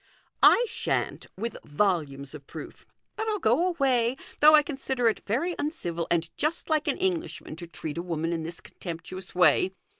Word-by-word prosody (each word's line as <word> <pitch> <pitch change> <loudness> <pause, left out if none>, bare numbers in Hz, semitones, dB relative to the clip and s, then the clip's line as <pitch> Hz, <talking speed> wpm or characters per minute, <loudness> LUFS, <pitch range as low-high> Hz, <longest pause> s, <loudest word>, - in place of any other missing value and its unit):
" - - -47 0.2
I 485 - +1
shan't, - - -2
with 230 +4 -3
volumes 145 -5 -1
of 145 -2 -10
proof. - - -10 0.3
But 440 0 -3
I'll 430 -1 +1
go 355 -1 +3
away, 265 -7 +2 0.2
though 305 +1 +9
I 300 - +6
consider 265 -4 -1
it 220 - -3
very 275 - 0
uncivil 175 - -3
and 170 -1 +2
just 315 +2 -1
like 310 -1 +2
an - - +1
Englishman 360 - -2
to 170 0 -6
treat 165 -1 -5
a - - -1
woman 165 -1 -2
in 165 - -2
this 165 +1 -6
contemptuous 180 +2 -8
way. 180 +2 +4
205 Hz, 180 wpm, -27 LUFS, -, 0.3 s, though